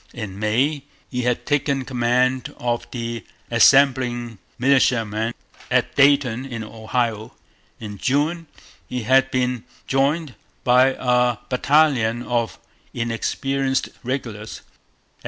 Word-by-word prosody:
In 100 -4 -6
May 130 +7 0 0.3
he 125 -1 -1
had 125 0 -1
taken 140 -2 0
command 125 +1 0
of 120 -1 -2
the 115 -3 -5 0.3
assembling 125 -5 +3 0.2
militiamen 115 -4 +2 0.3
at - - +1
Dayton 140 -4 +3
in 120 -4 -6
Ohio. 110 0 -3 0.4
In 105 -3 -8
June 155 +5 0 0.4
he 125 -2 -3
had 130 +3 +4
been 125 -3 -1 0.2
joined 140 +2 0 0.3
by 130 +2 +4
a 125 -2 +2
battalion 125 -4 +2
of 120 -2 -1 0.4
inexperienced 135 +3 -1
regulars. 115 -5 -5
125 Hz, 100 wpm, -22 LUFS, 115-135 Hz, 0.4 s, had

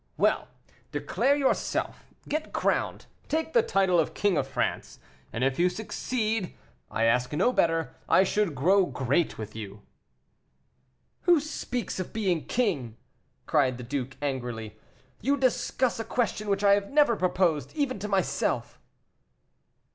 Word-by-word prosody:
Well! - - +2 0.4
declare 280 +1 +1
yourself 280 -2 -1 0.2
get 310 +2 -3
crowned - - 0 0.2
take 320 +1 -1
the 480 - +6
title 190 - +2
of 160 - 0
King 205 -3 +2
of - - 0
France - - -2 0.3
and 115 - -2
if 135 +2 +1
you 180 +1 +4
succeed, 220 0 -2 0.3
I 115 - -1
ask 125 +2 +2
no 190 +11 +2
better; 165 -4 +1 0.2
I - - +6
should 195 -4 0
grow 185 +8 +4
great 135 +5 0
with 110 -1 -7
you." 105 -1 -8 1.4
"Who 350 -3 +6
speaks 250 -7 -4
of 185 - -5
being 190 -7 0
king?" 145 - -1 0.5
cried 130 -3 +2
the 125 - -7
duke, 130 +1 -4
angrily; 120 -6 -3 0.5
"you 280 +4 +2
discuss 255 -2 +1
a - - -1
question 215 -2 -1
which 200 0 +1
I 200 0 +6
have 200 0 +1
never 290 -5 +4
proposed, 180 -5 +1
even 280 -7 -1
to 205 - -4
myself." 195 -3 -1
190 Hz, 140 wpm, -27 LUFS, -, 1.4 s, the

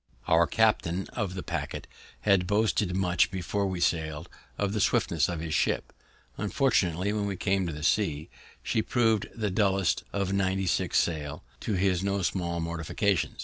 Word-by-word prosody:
Our 85 +1 +4
captain 95 -5 +1
of 100 -6 -3
the 95 - -4
paquet - - -4 0.4
had 100 -3 +3
boasted 105 -2 +1
much, 90 -2 +2
before 95 +2 -2
we 95 -2 -3
sailed, 80 -3 -1 0.3
of 100 -1 -1
the 105 - 0
swiftness 80 -5 +2
of 85 -2 -3
his 80 -1 -3
ship; 75 - 0 0.5
unfortunately, 100 - +1
when 105 -1 -1
we 100 - -2
came 95 0 0
to 75 -2 -5
sea, 80 -5 +1 0.4
she 110 - +1
proved 110 -3 +1
the 105 -3 -1
dullest 95 -2 +1
of 100 -1 -1
ninety 95 0 +1
six 90 - +1
sail, 75 -4 -1 0.2
to 110 - -2
his 95 -1 +1
no 100 -1 0
small 85 -1 -1
mortification. 85 +3 -1
95 Hz, 160 wpm, -28 LUFS, 85-100 Hz, 0.5 s, Our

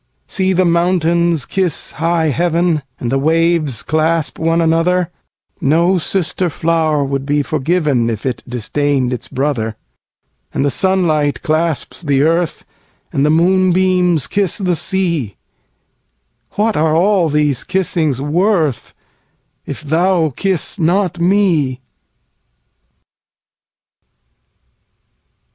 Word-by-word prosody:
See 190 -2 0
the 185 0 +2
mountains 170 -2 +1
kiss 185 -5 -2
high 165 0 0
heaven, 170 +1 +1 0.2
And 120 - -3
the 135 - +1
waves 160 -3 +1
clasp 160 0 0
one 165 +1 +1
another; 170 +2 +1 0.5
No 170 +6 +2
sister 180 +1 -1
flower 160 -2 0
would 135 0 -2
be 145 +1 0
forgivenIf 140 - 0
it 130 -2 -2
disdain'd 130 +2 -1
its 125 - -5
brother; 125 -5 -2 0.8
And - - +1
the 140 - +1
sunlight 155 -5 +1
clasps 160 -2 -1
the 140 -4 +1
earth, 165 +1 0 0.5
And 140 - +1
the 150 - +3
moonbeams 180 -1 +2
kiss 200 -3 0
the 180 -3 0 1.8
sea—What 215 +1 +1
are 155 0 +2
all 180 -1 +3
these 150 -3 0
kissings 170 -7 -1
worth, 160 - 0 0.7
If - - -6
thou 165 0 +1
kiss 190 -1 -2
not 175 +1 +1
me? 170 -8 +2
165 Hz, 105 wpm, -16 LUFS, 145-180 Hz, 1.8 s, the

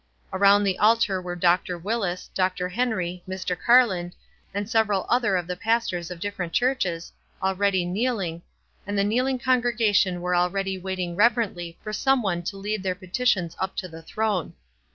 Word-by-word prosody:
Around 200 +2 +5
the 195 -2 0
altar 210 -3 +3
were 180 -1 -5
Dr. 175 0 +2
Willis, 195 -1 -3
Dr. 185 -1 0
Henry, 185 -5 -1
Mr. 185 -1 -2
Carland, 190 -5 +3 0.4
and 200 +1 -3
several 220 -4 +1
other 240 -5 +2
of 175 - -2
the 180 +1 -4
pastors 220 -4 -1
of 180 -2 -7
different 180 -3 -4
churches, 190 -10 0 0.3
already 190 -1 +1
kneeling, 190 -4 -1 0.5
and 205 0 -2
the 200 - +3
kneeling 250 +6 +1
congregation 235 -7 +2
were 180 0 0
already 190 +2 0
waiting 185 -2 -4
rev 230 +5 +5
erently 175 -8 -3
for 215 - -5
some 270 +1 +2
one 175 -4 -1
to 195 +3 -5
lead 210 +1 -3
their 185 -1 -1
petitions 185 -2 0
up 190 0 -2
to 185 - -4
the 165 -1 -11
throne. 205 0 -2
190 Hz, 165 wpm, -25 LUFS, 180-220 Hz, 0.5 s, Around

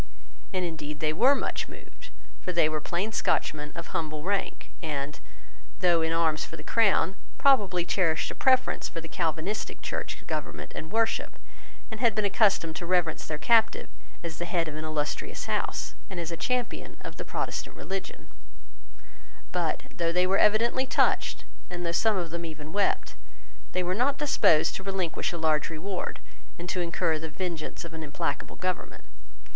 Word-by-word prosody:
And 185 -1 0
indeed 150 -3 -5
they 155 0 +1
were 260 - +6
much - - -2
moved. - - -12 0.3
For 180 - -2
they 170 -3 +4
were 155 -1 -1
plain 180 +8 -1
Scotchmen 150 -7 0
of 170 0 -6
humble 155 -2 -2
rank, 200 +2 -2
and, 150 -3 -3 0.6
though 175 -2 +4
in 160 0 +1
arms 165 -2 +2
for - - -7
the - - -9
crown, 205 -4 +3 0.2
probably 200 -11 +4
cherished 165 -4 +1
a - - -4
preference 260 -1 +3
for 165 - -5
the 165 - -7
Calvinistic 165 +5 -2
church - - -4
government - - -4
and 160 - -6
worship, 225 0 +1 0.5
and 220 - -5
had 235 -5 +4
been 215 -1 +2
accustomed 195 -5 +3
to 175 - -4
reverence 175 -3 +1
their 155 - -2
captive 225 +7 +4 0.3
as 165 -2 -5
the 175 - -1
head 170 -2 +1
of 155 - -5
an 155 - -4
illustrious 155 -1 -2
house - - -1 0.2
and 190 -3 -5
as 170 0 -3
a - - -1
champion 245 +9 -2
of - - -8
the - - -4
Protestant - - -3
religion 195 0 -5 1.2
But, - - 0
though 170 -1 +1
they 180 +1 +3
were 190 +1 +3
evidently 235 +5 +4
touched, - - +2 0.2
and 175 0 -4
though 170 - +1
some 210 +4 +3
of 170 -3 -2
them 170 0 -3
even 155 -1 -7
wept, 200 0 +1 0.6
they 185 - +1
were 180 +1 0
not 265 +7 +2
disposed 170 - +4
to 190 - -8
relinquish 190 -4 -1
a 170 - -4
large 155 -2 +2
reward 180 +4 -4 0.4
and 175 - -6
to 180 - 0
incur 170 -2 +1
the 160 0 -5
vengeance 170 -1 -4
of 165 - -8
an 160 - -5
implacable 155 +2 -3
government. 185 -1 -3
175 Hz, 175 wpm, -28 LUFS, 160-195 Hz, 1.2 s, were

